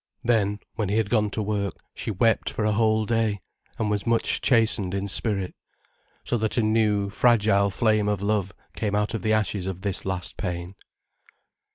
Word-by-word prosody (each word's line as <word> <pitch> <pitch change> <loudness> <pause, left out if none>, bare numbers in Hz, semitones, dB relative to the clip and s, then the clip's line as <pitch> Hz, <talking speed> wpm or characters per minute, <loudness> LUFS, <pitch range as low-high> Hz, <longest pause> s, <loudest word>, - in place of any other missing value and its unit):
Then, 105 -4 +2 0.2
when 110 -5 -2
he 105 - +1
had 110 -2 0
gone 105 -3 +2
to 105 +1 -2
work, 100 -2 -2 0.2
she - - -5
wept 110 +3 +2
for 105 - -2
a 105 - +2
whole 110 0 +2
day, 110 -2 0 0.4
and 105 -1 -1
was 105 +2 -2
much 115 -1 +2
chastened 110 -6 +2
in 100 +1 -2
spirit. 100 -2 -1 0.7
So 120 - -1
that 110 +1 -1
a 120 - +3
new, 105 -2 +1
fragile 105 -3 +3
flame 110 0 +1
of 105 -2 0
love 100 -2 0 0.2
came 105 -2 -1
out 105 +2 0
of 115 - -2
the 110 +3 +1
ashes 100 -3 0
of 95 -1 -5
this 100 -2 0
last 95 -2 -4
pain. 90 -1 -4
105 Hz, 185 wpm, -25 LUFS, 100-110 Hz, 0.7 s, a